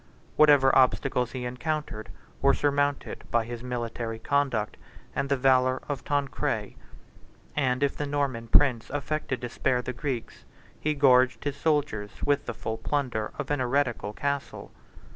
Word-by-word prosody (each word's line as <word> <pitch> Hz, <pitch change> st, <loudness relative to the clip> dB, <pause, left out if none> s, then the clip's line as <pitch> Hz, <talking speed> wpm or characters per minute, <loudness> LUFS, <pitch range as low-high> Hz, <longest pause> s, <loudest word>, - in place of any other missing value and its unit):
Whatever 145 Hz, -3 st, +6 dB
obstacles 125 Hz, -1 st, +2 dB
he 125 Hz, -2 st, -4 dB
encountered 125 Hz, -3 st, -3 dB, 0.3 s
were 140 Hz, 0 st, +5 dB
surmounted 145 Hz, 0 st, 0 dB
by 115 Hz, -1 st, +1 dB
his 120 Hz, 0 st, -6 dB
military 120 Hz, -2 st, -4 dB
conduct 130 Hz, -4 st, 0 dB, 0.4 s
and 140 Hz, 0 st, -1 dB
the 140 Hz, -, +2 dB
valor 130 Hz, 0 st, +3 dB
of 145 Hz, -3 st, -4 dB
Tancred; 145 Hz, -2 st, -1 dB, 0.8 s
and 130 Hz, -2 st, +1 dB
if 140 Hz, -, +1 dB
the 145 Hz, -, -3 dB
Norman 140 Hz, -5 st, -1 dB
prince 125 Hz, -2 st, +3 dB
affected 145 Hz, -3 st, -3 dB
to 120 Hz, -, -4 dB
spare 125 Hz, +1 st, 0 dB
the 125 Hz, -, -4 dB
Greeks, 125 Hz, -2 st, -4 dB, 0.4 s
he 155 Hz, 0 st, 0 dB
gorged 130 Hz, -3 st, +4 dB
his 145 Hz, -1 st, -2 dB
soldiers 145 Hz, -9 st, -1 dB
with 145 Hz, 0 st, +1 dB
the -, -, -3 dB
full 110 Hz, 0 st, -4 dB
plunder 120 Hz, -4 st, -1 dB
of -, -, -4 dB
an 145 Hz, -, +1 dB
heretical 125 Hz, -4 st, 0 dB
castle. 140 Hz, +4 st, -3 dB
130 Hz, 145 wpm, -27 LUFS, 120-145 Hz, 0.8 s, Whatever